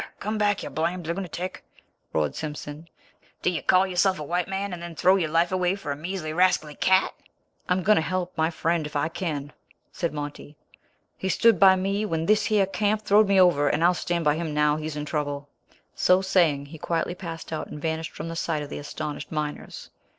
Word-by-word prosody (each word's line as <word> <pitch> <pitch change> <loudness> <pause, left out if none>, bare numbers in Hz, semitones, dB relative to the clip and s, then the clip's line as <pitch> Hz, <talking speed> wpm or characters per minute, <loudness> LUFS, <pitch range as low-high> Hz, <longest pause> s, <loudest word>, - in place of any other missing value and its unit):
Come 215 +1 -3
back, 205 -2 +1
you - - -6
blamed 170 +2 -2
lunatic!" 180 +1 -4 0.5
roared 75 -2 0
Simpson. 150 +1 -6 0.5
"Do - - +3
you 170 - -3
call 185 +1 +4
yourself 190 0 +2
a 155 - -5
white 175 +4 -1
man, 195 0 -3
and 175 - -6
then 170 -1 -7
throw 185 +4 +4
your 170 -5 0
life 165 +3 +2
away 185 0 +1
for 180 -8 -5
a - - -2
measly, 155 0 -4
rascally 165 -3 +2
cat?" 190 +5 +2 0.6
"I - - +5
am 185 0 -1
going 210 +3 +5
to - - +3
help 180 +2 -3
my 160 0 +1
friend 165 -1 -1
if 150 - -13
I 145 +2 +1
kin," 150 -5 -4 0.4
said 170 -2 -2
Monty. 145 0 -7 0.6
"He 190 - -2
stood 230 -2 +4
by 190 0 +8
me 195 +2 -1
when 165 -3 -1
thishyer 210 0 +3
camp 210 +2 0
throwed 210 +1 +5
me 195 -1 +4
over, 145 -6 +5
and 155 - 0
I'll 175 +1 +5
stand 175 -2 -2
by 150 - +4
him 160 -3 -3
now 150 0 +3
he's 155 0 -4
in 150 0 -4
trouble." 145 -2 -3 0.4
So 185 +1 +3
saying 170 -7 +2
he 150 +2 -11
quietly 170 +2 -1
passed 165 -3 -7
out 155 - -3
and 150 - -8
vanished 160 +1 -3
from 155 - -6
the 165 - -5
sight 160 -2 -1
of 145 - -8
the - - -5
astonished 150 +1 -6
miners. 150 -1 -5
170 Hz, 210 wpm, -25 LUFS, 150-185 Hz, 0.6 s, by